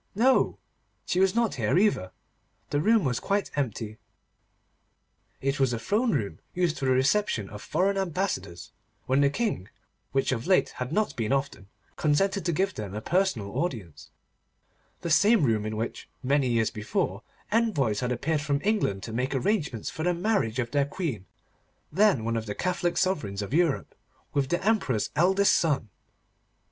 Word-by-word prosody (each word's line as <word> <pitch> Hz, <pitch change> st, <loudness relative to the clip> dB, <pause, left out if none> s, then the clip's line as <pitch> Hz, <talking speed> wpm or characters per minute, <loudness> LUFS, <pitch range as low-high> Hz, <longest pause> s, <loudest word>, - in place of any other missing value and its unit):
No! 255 Hz, +5 st, +3 dB, 0.5 s
She 180 Hz, -, 0 dB
was 190 Hz, +2 st, +3 dB
not 235 Hz, -2 st, +2 dB
here -, -, +1 dB
either. 185 Hz, -, +2 dB, 0.6 s
The 145 Hz, -, +1 dB
room 220 Hz, +3 st, +4 dB
was 125 Hz, -4 st, 0 dB
quite 200 Hz, 0 st, -1 dB
empty. 110 Hz, -5 st, -3 dB, 1.4 s
It 135 Hz, +1 st, -1 dB
was 130 Hz, -3 st, +2 dB
a -, -, -1 dB
throne 215 Hz, -, +1 dB
room, 100 Hz, -, -2 dB, 0.2 s
used 175 Hz, -3 st, 0 dB
for 135 Hz, -, -2 dB
the 130 Hz, -, +3 dB
reception 130 Hz, -, +2 dB
of 105 Hz, 0 st, -8 dB
foreign 195 Hz, +1 st, 0 dB
ambassadors, 165 Hz, -, -3 dB, 0.3 s
when 130 Hz, +2 st, +2 dB
the 140 Hz, -, +4 dB
King, 205 Hz, -, -2 dB, 0.4 s
which 135 Hz, 0 st, +1 dB
of 125 Hz, +4 st, -2 dB
late 185 Hz, -, +4 dB
had 125 Hz, +2 st, -5 dB
not 215 Hz, +5 st, 0 dB
been 110 Hz, -2 st, -2 dB
often, 135 Hz, -8 st, -1 dB, 0.3 s
consented 190 Hz, +6 st, +1 dB
to 175 Hz, -, +2 dB
give 190 Hz, +4 st, 0 dB
them 105 Hz, -2 st, -6 dB
a -, -, -2 dB
personal 175 Hz, -, 0 dB
audience; 110 Hz, -, -4 dB, 0.9 s
the 170 Hz, -, -3 dB
same 210 Hz, +4 st, +5 dB
room 110 Hz, -4 st, +1 dB
in 110 Hz, 0 st, -4 dB
which, 115 Hz, +2 st, -4 dB
many 140 Hz, +1 st, +2 dB
years 115 Hz, -2 st, +1 dB
before, 170 Hz, -, -2 dB, 0.3 s
envoys 155 Hz, -, +1 dB
had 125 Hz, 0 st, -1 dB
appeared 150 Hz, +5 st, 0 dB
from 145 Hz, -1 st, 0 dB
England 195 Hz, -, 0 dB
to 115 Hz, -, -6 dB
make 130 Hz, +4 st, -1 dB
arrangements 145 Hz, -, -1 dB
for -, -, -6 dB
the 175 Hz, +2 st, +1 dB
marriage 175 Hz, -, 0 dB
of 120 Hz, -2 st, -2 dB
their 140 Hz, -1 st, +2 dB
Queen, 140 Hz, -, -4 dB, 0.6 s
then 190 Hz, -, +3 dB
one 115 Hz, 0 st, 0 dB
of 110 Hz, -1 st, -4 dB
the 105 Hz, -, -4 dB
Catholic 180 Hz, -1 st, -1 dB
sovereigns 105 Hz, -, 0 dB
of 100 Hz, -, -6 dB
Europe, 165 Hz, -3 st, +1 dB, 0.4 s
with 135 Hz, -2 st, 0 dB
the 175 Hz, +2 st, -1 dB
Emperor's 190 Hz, -, +1 dB
eldest 190 Hz, +4 st, +4 dB
son. 140 Hz, -9 st, +1 dB
145 Hz, 170 wpm, -27 LUFS, 115-190 Hz, 1.4 s, same